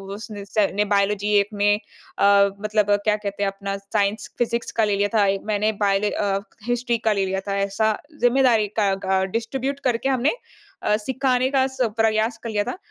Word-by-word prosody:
उसने 205 -1 -8
स 200 0 +1
ने 210 +1 +2
बायोलॉजी 205 +1 +1
एक 200 +1 0
में 205 +1 +2 0.4
अ, 200 0 +5
मतलब 210 -1 +1
क्या 210 -1 +3
कहते 200 -1 -4
हैं 195 - +1
अपना 195 0 -5
साइंस, 200 +2 -1
फ़िज़िक्स 235 0 -1
का - - +5
ले 205 -1 +1
लिया 205 0 +1
था। 205 - +4 0.2
मैंने 215 0 +1
बायोल 200 +1 +2
अ, 195 -1 0 0.3
हिस्ट्री 240 -1 0
का - - +3
ले 195 - +2
लिया 190 0 -2
था 195 - 0
ऐसा 210 +2 0 0.2
ज़िम्मेदारी 245 -4 +4
का 200 -2 +2
का 190 0 +2
डिस्ट्रीब्यूट 265 +4 -3
करके 240 +3 -1
हमने 260 +2 +2 0.5
अ, 210 - +3
सिखाने 260 +2 0
का 265 -1 +3
स 260 -1 -7 0.2
प्रयास 225 +1 +1
कर 230 - -4
लिया 205 -1 0
था। 250 - -5
210 Hz, 190 wpm, -23 LUFS, 200-235 Hz, 0.5 s, अ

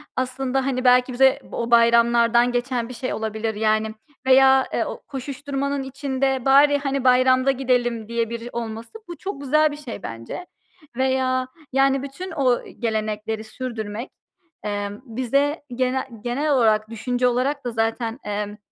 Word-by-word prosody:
aslında, 260 +1 -1
hani, 255 -2 -1
belki 250 0 +4
bize 265 +1 +4
o 235 0 -3
bayramlardan 235 +1 +5
geçen 245 -1 -2
bir - - -7
şey 255 +1 -4
olabilir, 220 0 -3
yani, 215 0 +1 0.3
veya, 265 0 +6
eee, - - +1
o - - -6
koşuşturmanın 280 +1 -3
içinde 265 -1 -2
bari, 285 +2 +6
hani, 275 -2 -2
bayramda 255 +1 +4
gidelim 245 -4 0
diye 230 -1 -1
biri 235 +1 -6
olması, 225 -1 -5 0.2
bu 345 -1 -8
çok 385 -7 -6
güzel 305 +2 +3
bir 295 - -7
şey 255 -9 -8
bence 115 - -7 0.5
veya, 260 -1 +1 0.3
yani, 270 0 +3
bütün 320 +8 -7
o 260 -6 +1 0.2
gelenekleri 220 -1 -2
sürdürmek, 220 -1 -6 0.5
emm, 205 0 -4
bize 275 +6 0
gene 260 +1 -1
genel 280 +5 -1
olarak 220 -5 +3
düşünce 245 +2 0
olarak 255 +3 0
da 245 - -2
zaten, 225 +1 -1
emm, 210 0 -3
250 Hz, 145 wpm, -23 LUFS, 230-270 Hz, 0.5 s, veya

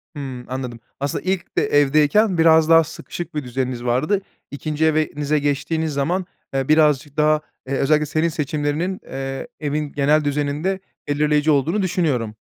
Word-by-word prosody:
Hıı, 130 -4 -6
anladım. 125 -2 -5 0.2
Aslında, 140 0 -2
ilk 185 -1 -3
de - - +4
evdeyken 150 +8 +3
biraz 160 -1 +5
daha 165 0 +7
sıkışık 170 +1 -8
bir 150 - -2
düzeniniz 125 -1 -3
vardı, 130 +12 +1 0.3
2'nci 150 +2 -1
evenize 150 -1 +1
geçtiğiniz 150 +2 -1
zaman, 170 +7 0 0.3
eee, 135 -1 -1
birazcık 150 -2 +3
daha, 155 0 +3 0.3
eee, 135 - -3
özellikle 150 +2 +2
senin 155 +3 0
seçimlerinin, 150 +4 -2
eee, 135 - -5
evin 150 -1 -2
genel 150 +2 +2
düzeninde 150 +6 -1 0.3
belirleyici 150 +1 +2
olduğunu 155 +8 +1
düşünüyorum. 145 - 0
150 Hz, 145 wpm, -21 LUFS, 140-160 Hz, 0.3 s, daha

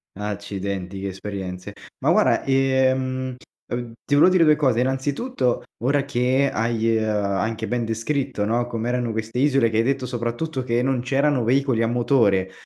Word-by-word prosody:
Accidenti 100 -2 -5
che 100 - -3
esperienze. 95 0 -6 0.3
Ma - - +4
guarda, - - +3
ehm, 130 -1 +1 0.3
ev 120 -1 -5
ti - - -2
volevo 145 +5 +6
dire 185 -2 +4
2 155 -1 +5
cose, 130 -6 +1
innanzitutto, 135 - -1 0.2
ora 140 +2 +1
che 130 +1 +1
hai, 115 0 +1
ehm, 110 - 0
anche 105 +2 -1
ben 120 -1 -1
descritto, 115 0 -2
no, 120 +3 0
come 115 -1 -3
erano 125 -1 -1
queste 110 +2 -3
isole 135 -4 +3
che 110 - 0
hai 115 - +3
detto 135 +1 0
soprattutto 125 +4 -3
che 120 0 0
non 130 -1 0
c'erano 135 +1 +1
veicoli 130 0 +2
a 115 - +2
motore. 115 -6 +2
120 Hz, 165 wpm, -23 LUFS, 110-135 Hz, 0.3 s, volevo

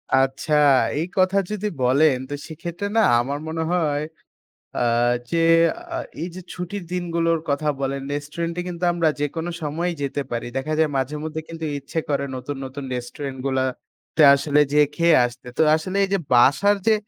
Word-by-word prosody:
আচ্ছা 135 +3 +1 0.5
এই 165 - 0
কথা 185 +1 +3
যদি 210 0 -2 0.2
বলেন 135 +3 +4
তো - - -4
সেক্ষেত্রে 170 +4 -5
না - - +6 0.2
আমার 140 +4 -2
মনে 160 0 -2
হয়, 150 -5 +1 0.8
আ - - 0 0.5
যে 170 - +1 0.6
আ - - -1 0.2
এই 170 - -2
যে 185 - -7
ছুটির 180 +2 -5
দিনগুলোর 170 -2 0
কথা 140 +2 0
বলেন, 135 0 -2
রেস্টুরেন্ট 155 +4 -4
এ - - 0
কিন্তু 175 0 -3
আমরা 165 -2 +2
যেকোনো 160 +4 -2
সময়ই 165 +3 -2
যেতে 140 +1 -2
পারি। 120 0 -3
দেখা 150 +4 -2
যায় 160 - +3
মাঝে 135 +3 -2
মধ্যে 160 0 -4
কিন্তু 165 -1 -5
ইচ্ছে 140 +4 -4
করে 140 -1 0
নতুন, 130 +3 -5
নতুন 135 +2 -7
রেস্টুরেন্ট 130 +2 -6
গুলা 130 -1 +1 0.5
তে 155 - +6
আসলে 145 +1 +1
যেয়ে 150 -1 +5
খেয়ে 170 -2 +4
আসতে। 120 +1 -8
তো - - +3
আসলে 185 +5 -3
এই 195 - -1
যে - - +4 0.2
বাসার 140 +12 +5
যে 220 - +6
155 Hz, 175 wpm, -22 LUFS, 140-170 Hz, 0.8 s, না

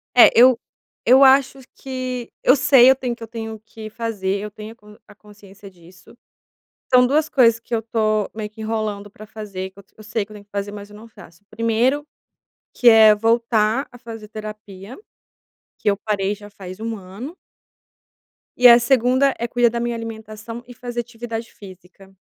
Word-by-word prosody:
É, 245 - +9
eu 250 0 +6 0.5
eu 260 +4 +6
acho 270 0 +4 0.2
que 255 -2 -6
eu 255 - +5
sei, 265 -2 +6
eu - - +3
tenho 250 -2 -4
que 230 - -12
eu - - -8
tenho 220 -1 -7
que 215 0 -10
fazer, 210 -4 -3
eu 210 - -7
tenho 215 +2 -10
a - - -25
con 210 -1 -18
a 205 - -17
consciência 205 -1 -16
disso. 180 +2 -19 0.8
São 250 0 +7
2 305 +4 +1
coisas 230 -6 +3
que 235 - -10
eu - - 0
estou 215 -2 -1
meio 210 -1 -5
que 220 +1 -13
enrolando 215 -2 -4
para 215 +1 -13
fazer 205 -3 -7
que 190 - -18
eu - - -15
tô - - -38
eu 215 - -13
sei 215 0 -3
que 215 - -21
eu - - -11
tenho 205 -1 -13
que 205 - -52
fazer, 200 0 -4
mas 205 0 -10
eu 210 - -14
não 220 +2 -13
faço. 205 -5 -17
Primeiro, 235 +6 0 0.7
que 245 - +4
é 220 -1 +7
voltar 230 +2 +1
a - - -12
fazer 225 -3 -10
terapia, 210 - -10 0.8
que 210 - -2
eu 200 - 0
parei 205 -1 -2
já 205 0 -14
faz 190 0 -11
um 225 0 -4
ano. 200 - -10 1.2
E 250 - +7
a 235 0 +8
2ª 260 +2 +2
é 235 - -2
cuidar 240 0 +2
da 235 +1 -4
minha 240 0 -2
alimentação 225 0 -8
e 245 - -11
fazer 240 -1 -6
atividade 230 0 -7
física. 190 0 -15
220 Hz, 195 wpm, -20 LUFS, 210-240 Hz, 1.2 s, É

